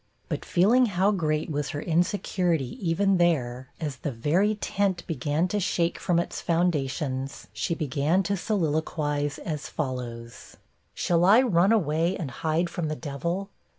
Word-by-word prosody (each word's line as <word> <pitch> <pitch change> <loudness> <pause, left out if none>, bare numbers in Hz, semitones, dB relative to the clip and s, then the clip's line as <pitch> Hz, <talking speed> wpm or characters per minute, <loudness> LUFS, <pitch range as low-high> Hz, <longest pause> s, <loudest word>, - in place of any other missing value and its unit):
But - - -3
feeling 235 +8 +4
how 195 0 +2
great 155 -5 -1
was 145 -1 -2
her 145 - -4
insecurity 175 -4 0
even 195 +3 +3
there, 130 -7 +1
as 150 -4 -4
the 145 - -3
very 170 - +1
tent 195 -4 -1
began 150 +3 0
to 210 - 0
shake 170 -2 0
from 175 - +1
its 170 - -2
foundations, 140 -5 -1
she 110 +10 -1
began 155 +4 +1
to 200 +1 0
soliloquise 155 -6 -1
as 155 -6 -5
follows: 120 -5 -5 0.4
'Shall 170 -1 +2
I 215 +8 +7
run 190 -4 +3
away 170 -3 +2
and 155 -8 -4
hide 160 +6 0
from 170 -1 -3
the 155 - -2
Devil? 170 +7 -4
165 Hz, 150 wpm, -26 LUFS, 145-185 Hz, 0.4 s, I